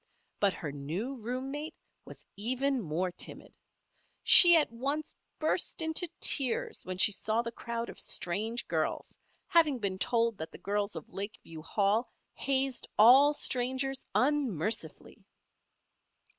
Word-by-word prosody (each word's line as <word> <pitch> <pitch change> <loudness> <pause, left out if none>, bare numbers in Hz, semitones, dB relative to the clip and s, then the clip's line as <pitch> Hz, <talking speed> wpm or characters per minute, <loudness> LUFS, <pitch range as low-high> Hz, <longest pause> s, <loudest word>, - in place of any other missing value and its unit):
But 200 -2 +2
her 150 - -5
new 160 - -4
room 255 +3 -5
mate 295 +3 -6 0.3
was - - -12
even 255 +5 -1
more 175 +1 -2
timid. - - -7 0.7
She 345 -1 +9
at 300 - +1
once 280 +6 -3 0.2
burst 315 +3 -1
into 320 +2 +1
tears 260 -5 -1
when 185 0 -6
she 210 - +4
saw 220 +3 -1
the 230 - -5
crowd 235 0 -5
of - - -10
strange 220 +7 -2
girls, - - -2 0.3
having 315 -5 +3
been 195 -4 -3
told 230 -1 +1
that 160 0 -6
the - - -11
girls 205 -1 -2
of 160 - -9
Lakeview 195 -5 -7
Hall 205 +7 0 0.2
hazed 270 -2 -1
all 270 +7 +7
strangers 260 +1 -1
unmercifully. 240 - -1
235 Hz, 130 wpm, -30 LUFS, 200-270 Hz, 0.7 s, She